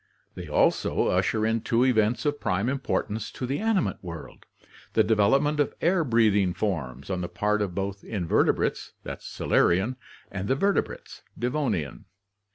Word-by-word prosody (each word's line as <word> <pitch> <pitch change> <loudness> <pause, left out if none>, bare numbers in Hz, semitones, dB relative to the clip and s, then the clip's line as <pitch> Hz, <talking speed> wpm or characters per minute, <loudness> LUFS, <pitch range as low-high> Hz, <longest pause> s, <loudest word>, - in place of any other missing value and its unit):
They - - -8
also - - +2
usher 110 -1 +1
in 110 0 +1
two 115 +3 +2
events 115 -1 +2
of 145 0 0
prime 100 +3 0
importance 115 -5 -2
to 130 - -4
the 135 +3 -2
animate 220 - 0
world, 85 -3 -9 0.5
the - - +4
de 110 - +2
velopment 135 +9 +3
of 145 - +1
air 175 0 +2
breathing 105 - +3
forms 70 - -3
on 90 -1 -1
the 85 - -4
part 105 0 0
of 95 -4 -2
both 100 0 -3
invertebrates 90 -7 0 0.3
(Silurian) 100 +9 +1 0.3
and 100 0 -4
the 130 - +2
vertebrates 200 +8 -1 0.2
(Devonian). 120 - -2
110 Hz, 150 wpm, -26 LUFS, 95-130 Hz, 0.5 s, the